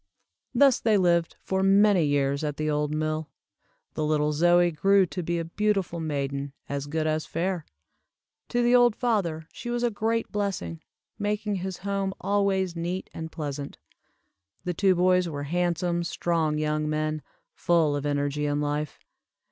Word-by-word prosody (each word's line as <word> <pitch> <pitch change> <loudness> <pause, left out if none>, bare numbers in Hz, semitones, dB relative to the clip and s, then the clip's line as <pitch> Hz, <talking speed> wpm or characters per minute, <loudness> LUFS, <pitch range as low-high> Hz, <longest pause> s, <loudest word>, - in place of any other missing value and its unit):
Thus 270 0 +5
they 220 -2 +3
lived 170 -3 +2
for 190 0 0
many 195 -1 +5
years 140 0 +1
at 150 -1 -2
the 155 0 0
old 150 0 0
mill. 155 0 -2 0.6
The 155 - -2
little 150 0 +1
Zoie 175 +3 +4
grew 195 +4 +4
to 180 +1 -5
be 170 0 -1
a 165 - -2
beautiful 195 -1 -1
maiden, 140 -3 -3
as 140 0 -3
good 155 +1 -1
as 155 0 -1
fair. 175 0 -2 0.8
To 240 0 +1
the 240 +1 +3
old 240 -3 +5
father 180 -10 -1
she 240 - -7
was 240 0 -1
a 240 - +2
great 225 +2 -1
blessing, 190 - -3 0.4
making 210 0 -1
his 185 0 -4
home 195 0 -2
always 195 -3 +1
neat 175 +3 -4
and 160 0 -6
pleasant. 145 -3 -5 0.9
The 180 - -2
two 190 +2 +3
boys 180 0 +3
were 145 -2 -4
handsome, 175 +2 0
strong 165 -3 0
young 150 0 0
men, 155 0 -1 0.3
full 165 - +2
of 145 - -3
energy 145 0 -1
and 145 0 0
life. 150 0 -2
170 Hz, 160 wpm, -26 LUFS, 150-195 Hz, 0.9 s, Thus